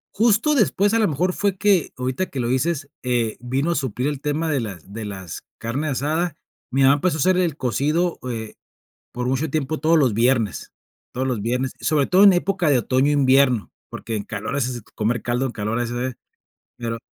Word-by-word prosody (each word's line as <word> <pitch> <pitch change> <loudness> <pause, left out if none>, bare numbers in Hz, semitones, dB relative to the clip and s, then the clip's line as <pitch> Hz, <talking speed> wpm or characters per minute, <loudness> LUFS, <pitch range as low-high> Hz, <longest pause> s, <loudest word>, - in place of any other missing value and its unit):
Justo 230 +7 +3
después, 205 -5 +2
a 230 - +3
lo 215 - +3
mejor, 175 +5 0
fue 200 0 0
que 195 -5 +2
ahorita 130 +8 -2
que 135 - -6
lo 120 - -1
dices, 145 +3 0
eh, 120 -3 0
vino 135 +7 -1
a - - 0
suplir 130 -1 -2
el 145 -2 -3
tema 155 +2 -1
de 140 - +1
las 100 -4 -7
de 110 0 -5
las 95 -5 -7 0.2
carne 130 +7 -3
asada. 155 +4 -1 0.4
Mi 135 +1 +2
mamá 135 +1 +7
empezó 155 +2 0
a - - -6
hacer 185 0 +4
el 170 -5 0
cocido, 150 - 0
eh, 110 -2 -5 0.6
por 125 0 -3
mucho 135 +4 0
tiempo 155 0 -2
todos 160 +2 +4
los 130 -7 +3
viernes, 115 -1 +1 0.4
todos 130 +1 -2
los 125 -6 -2
viernes, 125 +3 -1
sobre 145 -3 +2
todo 185 +2 +4
en 200 - +9
época 180 -2 +1
de 135 - +4
otoño, 130 +5 +2
invierno, 135 -5 +3 0.2
porque 115 - -6
en 105 - -2
calor 110 +5 -5
es 125 -3 -2
comer 115 +2 0
caldo, 120 +2 0
en - - -3
calor 110 +2 -2
es, 120 -1 -2 0.9
claro, 115 -1 -3
135 Hz, 200 wpm, -22 LUFS, 120-160 Hz, 0.9 s, en